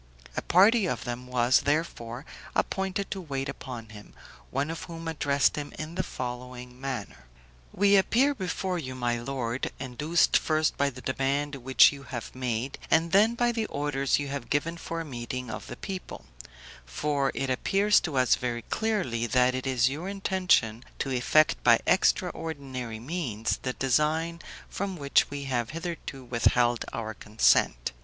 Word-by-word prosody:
A - - -1
party 200 +3 +5
of - - -2
them 120 +1 -5
was, 125 0 +3
therefore, 140 -4 -2 0.3
appointed 195 +1 -1
to 195 - -3
wait 135 -4 -3
upon 125 -5 -7
him, 105 -1 -13 0.3
one 140 +4 -1
of 165 - -6
whom 165 -1 -8
addressed 145 -3 +2
him 145 -1 -4
in 155 +1 -5
the 185 - 0
following 125 -3 -7
manner: 130 - -5 0.4
"We 200 +1 +4
appear 245 +8 +4
before 185 -4 -2
you, 130 -4 -6
my 120 -2 -1
lord, 125 -1 -3
induced 150 +6 +2
first 155 0 +1
by 140 0 +2
the 125 -1 -11
demand 140 +3 -1
which 130 +1 +6
you 140 -1 -9
have 125 -3 -7
made, 125 0 -3
and 165 +1 +3
then 215 +4 +5
by 240 0 +2
the 225 -2 -2
orders 140 -1 0
you 145 -1 -3
have 140 -3 -5
given 160 +4 0
for 165 0 -5
a - - -6
meeting 125 -2 -5
of - - -7
the 120 - -8
people; 190 -1 -7 0.6
for 140 - -1
it 135 -1 -1
appears 200 +10 +3
to 155 -5 -3
us 130 -1 +4
very 120 -2 -2
clearly, 180 - -1
that 125 +1 +3
it 130 +1 -3
is 130 -1 +3
your 155 +8 -3
intention 185 - +1
to 135 - -2
effect 130 +5 +3
by - - +6
extraordinary 130 -8 0
means 125 -5 -2
the 130 - -2
design 155 +6 +1 0.3
from 195 -2 -4
which 140 -2 +3
we 145 0 -5
have 120 -4 -1
hitherto 165 -4 -6
withheld 120 0 +2
our 110 -1 -4
consent. 105 - +2
135 Hz, 165 wpm, -28 LUFS, 125-165 Hz, 0.6 s, which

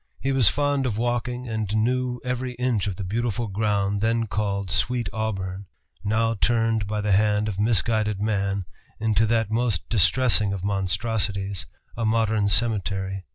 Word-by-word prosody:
He 135 - -1
was 130 -6 +5
fond 145 -2 0
of 110 -4 -2
walking 120 +1 -2
and 110 -2 -2
knew 125 +2 0
every 125 0 -2
inch 120 -5 0
of 95 - -2
the 100 - -5
beautiful 115 +3 -1
ground 100 -1 0
then 115 +1 +1
called 100 -3 -2
"Sweet 125 +3 +1
Auburn," 95 -3 -3 0.4
now 110 +2 +1
turned 115 -1 +1
by 105 0 -2
the 105 0 0
hand 105 +1 +3
of 100 -2 -4
misguided 110 -1 +1
man 100 -2 -1 0.3
into 110 0 +2
that 115 -1 +1
most 115 -5 0
distressing 110 0 +3
of 95 -2 -5
monstrosities 100 -1 -1 0.3
a 115 - -3
modern 110 -2 +2
cemetery. 95 -3 -1
110 Hz, 155 wpm, -24 LUFS, 100-115 Hz, 0.4 s, was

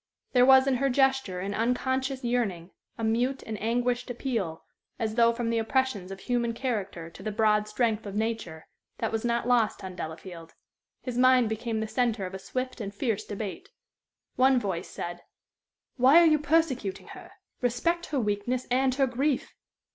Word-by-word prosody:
There 250 0 +5
was 265 0 +7
in 270 -2 +2
her 275 +2 +1
gesture 265 -8 +1
an 200 +2 -3
unconscious 260 +3 -1
yearning, 205 -8 -1 0.3
a 225 - -5
mute 245 +5 0
and 220 - -4
anguished 245 +2 0
appeal, 230 -10 -3 0.3
as 220 -3 -2
though 230 0 +5
from 230 0 -2
the 230 - +1
oppressions 225 -4 0
of 195 0 -8
human 235 -1 0
character 200 -9 -3
to - - -13
the 215 - -3
broad 210 0 +2
strength 220 -1 0
of 200 - -6
nature, 215 -8 -3 0.3
that 225 - -2
was 225 -1 -2
not 235 0 0
lost 235 -5 +2
on 185 -1 -7
Delafield. 165 0 -8 0.5
His 250 -2 -3
mind 255 -2 +5
became 220 0 -2
the 220 - -2
centre 230 -4 0
of 185 - -7
a 190 - -5
swift 255 +5 -4
and 200 -2 -4
fierce 215 0 -2
debate. 205 -1 -6 0.7
One 260 0 +5
voice 190 -7 -3
said: 175 0 -6 0.8
"Why 265 +6 +7
are 340 - +6
you 310 -2 +4
persecuting 270 - 0
her? - - -11 0.3
Respect 335 +9 0
her 285 - -1
weakness 220 +3 -1
and 260 0 +2
her 275 0 +3
grief." 265 +2 -1
235 Hz, 175 wpm, -28 LUFS, 205-255 Hz, 0.8 s, was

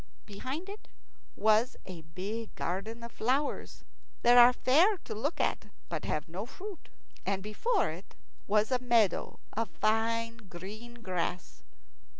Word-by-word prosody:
Behind 260 - -5
it 410 +2 -9 0.5
was 220 +3 +3
a 180 -3 -8
big 195 +8 -6
garden 215 +6 -3
of 235 - -7
flowers, 270 +6 -1 0.4
that 240 +1 +7
are 245 0 +10
fair 325 - +4
to - - -5
look 280 +10 -2
at - - 0 0.2
but - - -3
have - - -1
no - - -5
fruit, 395 -2 -9 0.3
and 195 -1 -1
before 350 - +1
it 175 +5 -10 0.3
was 210 +3 +3
a 255 - +3
meadow 235 -6 +2 0.2
of 225 -1 -1
fine 225 +6 +1
green 215 +7 -8
grass. 180 -1 -3
225 Hz, 140 wpm, -31 LUFS, 200-250 Hz, 0.5 s, are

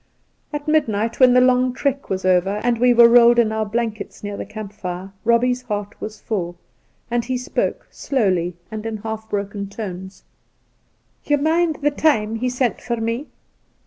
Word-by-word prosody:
At 295 0 -5
midnight, 230 -8 +1
when 255 -2 +7
the 250 - +6
long 255 0 +4
night 250 - -4
trek 275 0 -2
was 190 -1 -2
over, 185 +2 +2
and 240 -1 +1
we 250 +1 +5
were 235 -1 +8
rolled 240 0 +6
in 230 -2 +3
our 220 -1 -1
blankets 220 -1 -4
near 205 0 -4
the - - -6
camp 210 -1 -8
fixe, 185 -2 -6
Eobbie's 245 +2 +2
heart 205 -4 -4
was 215 0 -6
full, 175 -5 -3 0.5
and 240 -1 0
he 255 0 -1
spoke 250 - -2
— - - -40
slowly 185 -9 0 0.2
and 215 -1 -5
in 220 -1 -3
half 220 +1 -6
broken 200 0 -3
tones: 190 -2 -7 0.5
' - - -43
Ye 295 - +3
mind 320 +2 +1
the 295 - +3
time 225 -8 +1
he 250 +2 -1
sent 250 -1 -1
for 235 -1 -2
me 230 +5 -2
225 Hz, 185 wpm, -21 LUFS, 205-250 Hz, 0.5 s, were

